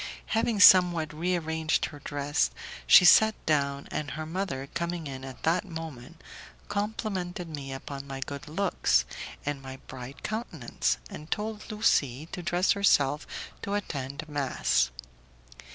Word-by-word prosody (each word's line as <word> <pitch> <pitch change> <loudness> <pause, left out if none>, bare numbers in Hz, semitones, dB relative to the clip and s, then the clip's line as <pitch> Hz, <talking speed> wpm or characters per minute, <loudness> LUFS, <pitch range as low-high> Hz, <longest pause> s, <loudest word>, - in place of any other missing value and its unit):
Having 225 -1 +1
somewhat 175 -5 +7
rearranged 160 -1 0
her 145 - -9
dress 145 +2 0 0.4
she 180 - +9
sat 220 +4 +7
down, 140 -2 0
and 150 -2 -3
her 155 +4 -5
mother, 160 -6 -3
coming 170 -1 -3
in 135 -2 -6
at 135 -1 -9
that 170 +4 +2
moment, 160 - -8 0.5
complimented 195 -4 -3
me 140 -4 -6
upon 135 +1 -7
my 135 -1 -6
good 140 +2 -6
looks 160 - +1 0.4
and 145 -1 -2
my 130 0 -8
bright 130 +1 -9
countenance, 125 - -2
and 155 +2 -9
told 215 0 -3
Lucie 150 - +1
to 180 - -5
dress 175 +2 +2
herself 150 -8 +3 0.3
to 200 - -2
attend 140 -5 -4
mass. 135 - +1
155 Hz, 135 wpm, -28 LUFS, 140-180 Hz, 0.5 s, she